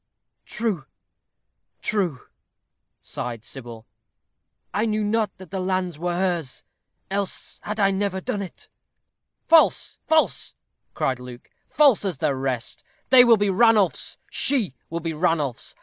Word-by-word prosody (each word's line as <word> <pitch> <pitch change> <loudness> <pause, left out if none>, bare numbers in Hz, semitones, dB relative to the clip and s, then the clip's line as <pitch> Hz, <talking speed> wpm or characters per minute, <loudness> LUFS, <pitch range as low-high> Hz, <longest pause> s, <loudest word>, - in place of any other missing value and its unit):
"True, 205 - -2 1.0
true," 180 -11 -1 0.8
sighed 120 -2 -5
Sybil. 120 -4 -8 0.9
"I 215 +2 +1
knew 215 0 0
not 215 +1 0
that 190 0 -12
the 195 - -2
lands 185 -3 -1
were 175 0 -1
hers, 175 -8 -2 0.5
else 200 -1 -3
had 210 +1 -5
I 195 -1 +4
never 195 -1 -1
done 200 +2 -3
it." 190 - -9 0.8
"False, 325 -1 +4
false," 315 0 +1 0.4
cried 130 -2 0
Luke; 125 -1 -11 0.2
"false 285 -9 +5
as 190 -7 -1
the 140 - 0
rest. 130 -3 -3 0.3
They 255 -1 +10
will 235 -2 +6
be 205 -1 +1
Ranulph's. 215 -2 +3
She 240 - +2 0.2
will 170 +1 -3
be 165 0 -3
Ranulph's. 150 -6 -1
185 Hz, 130 wpm, -24 LUFS, 145-210 Hz, 1.0 s, They